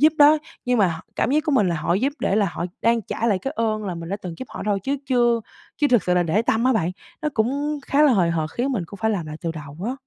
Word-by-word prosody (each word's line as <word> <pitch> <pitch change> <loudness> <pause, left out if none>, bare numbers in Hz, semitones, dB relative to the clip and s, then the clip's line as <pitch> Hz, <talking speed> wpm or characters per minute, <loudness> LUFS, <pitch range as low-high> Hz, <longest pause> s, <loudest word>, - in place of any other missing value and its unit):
giúp 305 +1 +6
đó 295 +1 +7 0.3
nhưng 250 -2 +1
mà 200 - +5
họ 165 -1 -4 0.2
cảm - - +1
giác 305 +2 +2
của 305 - 0
mình 210 -8 +3
là 170 - 0
họ 160 +2 0
giúp 260 +9 +1
để 195 - +1
là 205 -2 +3
họ - - -3 0.2
đang 230 -1 +3
trả 230 - -3
lại 205 -5 +2
cái 270 +9 -4
ơn 215 -2 0
là 185 - -3
mình 170 0 -7
đã 200 - -2
từng 175 -3 -5
giúp 260 - -7
họ - - -7
thôi 205 -1 +1
chứ 275 +6 -1
chưa 240 -3 +3 0.4
chứ 290 - +2
thực 240 -5 +4
sự 180 - +1
là 180 - +3
để 175 +7 +1
tâm 230 +1 +1
á 260 - +4
bạn, 180 -6 +1 0.3
nó 300 - +1
cũng 285 +6 0
khá 290 +2 +3
là 290 -4 +6
hời 175 -5 +3
hợt 160 -2 -1
khiến 265 +7 -1
mình 210 - -1
cũng 200 - -11
phải 220 - +3
làm 180 -7 -2
lại 155 0 -6
từ 170 - -2
đầu 145 -2 -9
á. 250 - -1
220 Hz, 310 wpm, -23 LUFS, 180-260 Hz, 0.4 s, đó